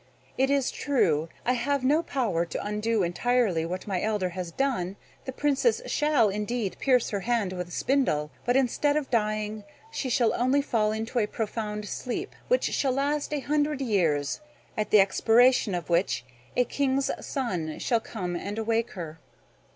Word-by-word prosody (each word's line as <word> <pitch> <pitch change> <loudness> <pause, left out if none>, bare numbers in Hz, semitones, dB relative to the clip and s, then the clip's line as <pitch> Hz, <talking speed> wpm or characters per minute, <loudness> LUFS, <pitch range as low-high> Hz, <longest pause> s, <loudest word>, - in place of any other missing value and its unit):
It 265 +1 +2
is 280 -2 +2
true, 175 - +1 0.2
I 250 - +3
have 275 +2 0
no 295 +5 +4
power 235 - 0
to 170 +3 -5
undo 210 0 0
entirely 180 -2 +1
what 185 +2 -4
my 190 -3 -1
elder 210 -4 0
has 180 0 -5
done. 200 -7 -1 0.3
The 260 - -3
Princess 290 - +1
shall 295 -8 +3
indeed 210 +1 -2
pierce 255 -3 +2
her 200 - -1
hand 220 -3 0
with 180 -1 -4
a - - -14
spindle; 165 - +1
but, 245 - +1
instead 275 +3 +2
of 290 -4 -3
dying, 215 -2 0 0.3
she 275 -11 -3
shall 240 -2 +3
only 260 +3 +2
fall 215 -5 +1
into 225 +3 -2
a 210 - +1
profound 210 -1 -4
sleep, 355 - -4
which - - +2
shall 270 -2 +1
last 285 +3 -1
a 295 -2 -1
hundred 295 0 0
years, 170 - +1 0.3
at 215 - -1
the 210 - +6
expiration 225 +2 +4
of 175 -3 -4
which 170 -7 +1 0.3
a 250 - +5
king's 275 +1 0
son 180 - -3
shall 235 -3 +1
come 180 -6 -5
and 200 +4 -4
awake 225 +1 0
her." 165 -4 -7
225 Hz, 170 wpm, -27 LUFS, 190-265 Hz, 0.3 s, the